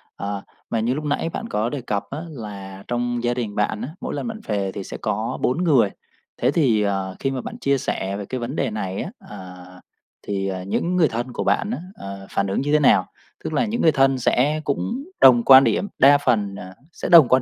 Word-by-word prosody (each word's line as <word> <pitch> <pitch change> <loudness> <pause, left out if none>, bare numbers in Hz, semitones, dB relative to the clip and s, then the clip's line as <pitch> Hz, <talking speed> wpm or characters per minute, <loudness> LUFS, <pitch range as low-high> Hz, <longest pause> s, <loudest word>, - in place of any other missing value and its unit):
Ờ, 100 0 -4 0.3
mà 115 - 0
như 115 +3 +1
lúc 150 - -4
nãy 150 +2 -1
bạn - - -5
có 105 +2 0
đề 140 0 -4
cập 105 -4 -2
á 145 - -5
là 100 -7 -8
trong 120 0 -2
gia 120 0 +1
đình 115 -4 -4
bạn 105 +1 0
á, - - -4
mỗi - - -4
lần - - -3
bạn 220 -1 -5
về 100 -2 -1
thì 100 - -6
sẽ - - -7
có - - -2
4 135 +8 +1
người, 130 - +4 0.5
thế 125 - +3
thì, 130 -9 +2
à, 95 -2 -2
khi 135 - -1
mà 130 - -3
bạn - - -7
chia 140 0 +2
sẻ 100 -6 -3
về 100 - -5
cái 130 +5 -4
vấn 120 +4 -4
đề 135 -5 0
này 95 -3 -3
á, - - -5 0.2
à, 90 -1 -9 0.7
thì, 95 -1 -1
à, 95 -1 -4
những 170 - -1
người 170 -4 +4
thân 120 +1 -4
của - - -2
bạn 210 - +1
á, - - -2 0.2
ờ, 100 - -8
phản 100 - -1
ứng 95 - -1
như 145 +2 -1
thế 150 - +5
nào? 100 -10 +4 0.4
Tức - - -4
là 150 - +2
những 230 +2 -2
người 160 - +5
thân 135 -2 +3
sẽ 140 +5 +1
cũng 230 - -2 0.2
đồng 120 -3 +7
quan 135 0 +9
điểm, 200 - +1
đa 140 +2 +7
phần, 110 -8 0
à, 95 -1 -9 0.2
sẽ - - -5
đồng 165 -6 +9
quan 130 +2 +4
120 Hz, 240 wpm, -22 LUFS, 100-140 Hz, 0.7 s, quan